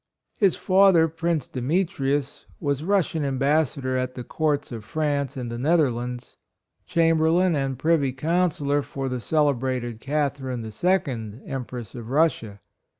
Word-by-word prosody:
His 195 -5 +3
father, 190 -4 +5
Prince 165 -2 -2
Demetrius, 140 -1 -1
was 145 -3 -1
Russian 170 -4 +1
Ambassador 140 -1 0
at 130 0 -2
the 125 - -5
Courts 145 +1 -1
of 115 -3 -6
France 140 0 -1
and 120 -2 -4
the 120 - -5
Netherlands, 125 -5 0 0.5
Chamberlain 165 +2 +3
and 135 -2 -1
Privy 155 -2 +2
Counsellor 150 0 0
for 135 -1 -4
the 125 -1 -3
celebrated 130 -5 0
Catharine 135 -4 -2
II, 120 - -1
Em 135 -2 -4
press 120 -4 -8
of 120 -2 -8
Russia. 130 -9 +1
140 Hz, 130 wpm, -24 LUFS, 125-160 Hz, 0.5 s, father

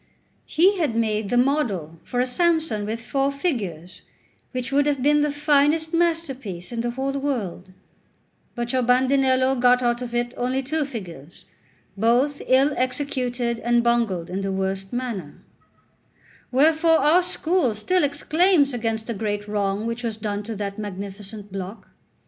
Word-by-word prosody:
He 370 +5 +3
had 295 -9 0
made 215 -2 0
the 245 - +1
model 225 - 0
for 245 - -3
a 250 - +3
Samson 315 -6 +1
with 230 +2 -4
four 275 +2 0
figures, 200 - -3 0.5
which 255 0 -4
would 285 +1 +3
have 280 -3 0
been 295 +1 +4
the 295 0 +1
finest 295 +2 +2
masterpiece 270 - -1
in 235 -1 -2
the 240 - -1
whole 265 +3 -2
world; 245 -10 -3 0.8
but 240 +1 -3
your 260 - +2
Bandinello 260 +1 +3
got 250 0 +4
out 240 0 +1
of 240 -1 -5
it 240 0 -1
only 255 +2 -1
two 310 +3 -1
figures, 175 - -9 0.5
both 245 +7 +2
ill 270 +3 +4
executed 250 -2 -1
and 240 0 +2
bungled 225 -8 0
in 190 +2 -2
the 195 0 -2
worst 190 0 -3
manner; 235 -11 -4 1.2
wherefore 320 +5 +4
our 310 +6 +4
school 335 - 0
still 360 +11 +1
exclaims 300 +1 +2
against 225 -2 -2
the 235 - -3
great 205 0 -3
wrong 205 0 -1
which 230 +1 -3
was 230 -3 -3
done 205 -1 -3
to 220 +2 -6
that 200 0 -5
magnificent 205 +1 -7
block. 195 +2 -7
245 Hz, 155 wpm, -23 LUFS, 210-280 Hz, 1.2 s, been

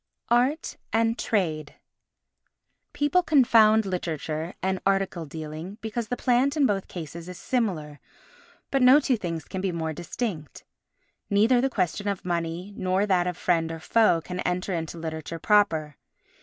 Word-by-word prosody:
Art 250 +6 +1
and 225 0 +2
Trade 160 -11 -1 1.2
People 290 +5 +2
confound 230 - +5
literature 165 -2 -3
and 190 0 0
article 195 -4 0
dealing 160 +6 -7
because 225 +1 -4
the 245 - -3
plant 260 +4 +2
in 290 - +4
both 200 -5 0
cases 170 0 -8
is 180 - -8
similar, 170 - -2 0.7
but 275 - +2
no 255 +3 +8
two 270 -4 +1
things 165 -7 -4
can 190 - -5
be 190 -1 -1
more 160 -2 -3
distinct. 175 - -5 0.7
Neither 225 +5 +4
the 270 - +1
question 200 -2 -1
of 200 -3 -3
money 170 +2 -3
nor 185 +2 +1
that 180 -3 +2
of 180 -1 -3
friend 165 -2 +1
or 165 - -6
foe 195 -1 +3
can 180 +2 -6
enter 180 +2 -1
into 165 0 -4
literature 160 0 -5
proper. 165 -6 +2
185 Hz, 150 wpm, -26 LUFS, 165-225 Hz, 1.2 s, no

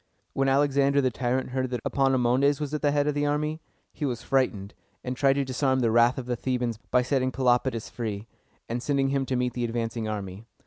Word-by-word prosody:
When 135 0 +1
Alexander 140 0 +3
the 130 -2 +2
tyrant 125 +2 -1
heard 130 0 -1
that 125 -2 -3
Epaminondas 135 +1 +2
was 150 -1 -4
at 150 - -2
the 145 - +3
head 145 0 +1
of 150 - +1
the 145 0 0
army, 150 +2 -1 0.3
he - - -7
was 125 -4 -2
frightened, 110 -7 0 0.3
and 125 0 -3
tried 135 +1 +3
to 140 0 -1
disarm 130 0 0
the 115 -2 +2
wrath 120 +2 +4
of 130 - -4
the 125 0 -1
Thebans 120 -2 -2
by 125 0 +3
setting 130 0 0
Pelopidas 125 -2 +1
free, 110 -3 -4 0.4
and 120 +1 -3
sending 135 0 +1
him 135 -1 -1
to 130 - -1
meet 125 0 0
the 120 - -3
advancing 115 -1 -2
army. 100 0 -6
130 Hz, 215 wpm, -26 LUFS, 120-140 Hz, 0.4 s, wrath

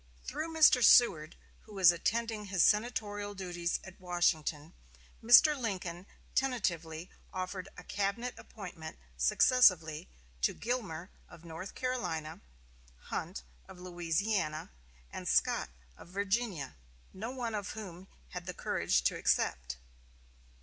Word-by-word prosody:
Through 310 +4 -4
Mr. 305 -6 +6
Seward, 165 -13 +6 0.3
who 215 - -13
was 185 -3 +7
attending 220 +5 -2
his 190 -4 +2
senatorial 205 -2 +1
duties 175 -2 -2
at 185 0 -12
Washington, 170 -3 0 0.5
Mr. 245 +7 +8
Lincoln 190 -7 -4 0.3
tentatively 175 -10 -1 0.2
offered 185 0 -4
a - - -9
cabinet 205 +5 -2
appointment 170 - -9 0.2
successively 160 - +4 0.3
to - - +1
Gilmer 200 -8 -4 0.2
of 165 - -14
North 165 +3 -8
Carolina, 180 -12 -3 0.7
Hunt 65 - -4 0.2
of - - -12
Louisiana 175 - -2 0.4
and - - -6
Scott - - +2 0.3
of - - -14
Virginia, 195 - -2 0.4
no 215 +5 -5
one 245 -3 -4
of 205 -2 -4
whom 190 -4 -9 0.2
had - - -7
the - - -5
courage - - 0
to - - +1
accept. 65 +1 0
190 Hz, 115 wpm, -32 LUFS, 170-225 Hz, 0.7 s, Mr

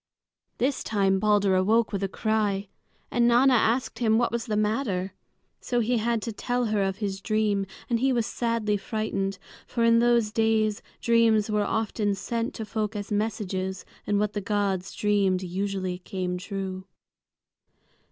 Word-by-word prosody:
This 265 +2 0
time 195 -3 +1
Balder 205 -1 +3
awoke 220 +5 +3
with 200 - -1
a 195 - 0
cry, 205 -2 0 0.4
and 240 -1 +3
Nanna 250 +3 +5
asked 240 +2 +1
him 220 -2 +3
what 240 0 +1
was 235 +1 -3
the 210 -2 0
matter. 210 -4 -1 0.5
So 245 - -1
he 235 +1 +1
had 230 0 0
to 230 - -3
tell 245 +4 -1
her 205 - +2
of 195 0 -1
his 195 -3 -3
dream, 210 -2 0 0.2
and 235 -1 +1
he 265 +2 +2
was 235 -3 +1
sadly 230 -3 0
frightened; 195 -2 -2 0.3
for 235 - -1
in 230 0 +5
those 235 -2 +3
days 220 -1 +1 0.2
dreams 225 -2 +3
were 210 0 +2
often 210 -1 0
sent 230 +5 -3
to 220 - -5
folk 215 0 -3
as 205 +1 -5
messages, 195 -3 -2 0.2
and 205 - +2
what 210 0 0
the 205 - -2
gods 200 -2 -1
dreamed 200 -3 +1
usually 185 0 -3
came 180 -1 -3
true. 190 -1 -5
210 Hz, 160 wpm, -26 LUFS, 195-230 Hz, 0.5 s, Nanna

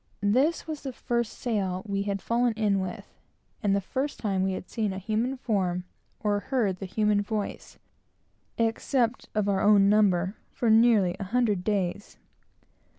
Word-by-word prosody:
This 290 +7 +2
was 310 -2 -5
the 265 -2 -5
first 235 -1 -2
sail 195 -6 -2
we 200 -1 -1
had 200 -1 -3
fallen 235 0 +1
in 210 -3 +1
with, 185 -2 -5 0.6
and 200 -1 +2
the - - +2
first 270 +9 -3
time 195 -4 -1
we 190 0 0
had 185 - -6
seen 215 -4 -2
a - - -5
human 225 +7 -1
form 185 -7 -1 0.4
or 205 -1 +1
heard 210 -6 0
the 195 - -5
human 210 +1 +2
voice, 205 0 -4 0.8
except 230 +2 0
of 210 -1 +1
our 195 -1 +1
own 205 -1 +5
number, 200 -2 +3
for 235 -3 0
nearly 220 -5 +5
a 195 - -3
hundred 210 -3 +1
days. 200 -1 -2
210 Hz, 160 wpm, -27 LUFS, 195-235 Hz, 0.8 s, own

